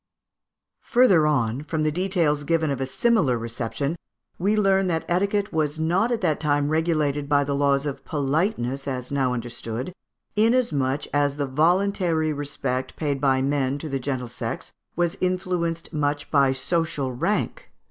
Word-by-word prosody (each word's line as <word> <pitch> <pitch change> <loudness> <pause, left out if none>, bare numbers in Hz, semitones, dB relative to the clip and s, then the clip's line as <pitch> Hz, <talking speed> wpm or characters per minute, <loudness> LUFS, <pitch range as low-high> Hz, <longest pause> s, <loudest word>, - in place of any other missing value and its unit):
Further 195 -11 +4
on, 130 -4 +1
from 155 +1 -2
the 155 - +2
details 170 -4 +1
given 160 0 +1
of 135 -1 -2
a 135 - -1
similar 165 - +2
reception, 115 +6 -3 0.4
we 200 +4 +2
learn 195 -2 +3
that 165 -2 -1
etiquette 200 +3 0
was 155 -1 0
not 180 +9 +1
at 235 - 0
that 160 -5 +1
time 145 -1 +1
regulated 155 -3 0
by 145 -1 +4
the 140 0 -2
laws 140 0 +2
of 145 -2 -4
politeness 140 - -1
as 125 -1 -4
now 135 -2 +1
understood, 120 +4 -4 0.4
inasmuch 210 - +2
as 145 -1 +1
the 145 - 0
voluntary 165 +2 +1
respect 135 -3 -3
paid 145 -3 -2
by 135 -2 +3
men 140 -1 0
to 155 +2 -6
the 135 -1 -2
gentle 130 -2 -3
sex 120 - -5 0.2
was 175 +2 0
influenced 180 -2 -1
much 145 -1 -1
by 140 -3 +4
social 140 -1 -1
rank. 210 - -2
150 Hz, 155 wpm, -24 LUFS, 135-175 Hz, 0.4 s, Further